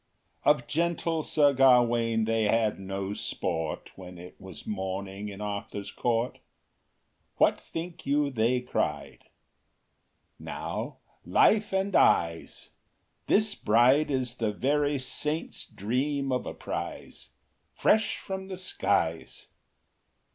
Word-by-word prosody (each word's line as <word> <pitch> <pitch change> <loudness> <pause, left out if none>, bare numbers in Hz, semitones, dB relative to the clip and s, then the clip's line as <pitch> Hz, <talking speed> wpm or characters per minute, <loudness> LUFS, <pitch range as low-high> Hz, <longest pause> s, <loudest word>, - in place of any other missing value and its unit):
IV - - -8
Of 125 - -12
gentle 165 +1 0
Sir 145 -2 +3
Gawain 120 -4 +4
they 110 0 +1
had 110 -1 +1
no 95 +1 -4
sport, 80 -5 -3
When 90 -1 -10
it 90 +1 -11
was 95 -3 -9
morning 95 0 -4
in 100 0 -9
Arthur’s 105 -1 -5
court; 120 0 -1 1.0
What - - +3
think 165 +1 -7
you 145 0 +2
they 125 +1 +1
cried? 125 - -3 1.1
Now, - - -5 0.3
life 215 -1 +3
and 190 0 0
eyes! 85 -1 +2 0.6
This 215 +1 +3
bride 125 +7 +4
is 130 -3 -1
the 110 -2 0
very 145 +6 +1
Saint’s 150 +4 -2
dream 135 +6 -1
of 125 - -1
a - - -4
prize, - - -6 0.5
Fresh 220 0 +2
from 190 -1 -6
the 190 -1 -6
skies! 95 - -1
120 Hz, 115 wpm, -28 LUFS, 100-150 Hz, 1.1 s, Gawain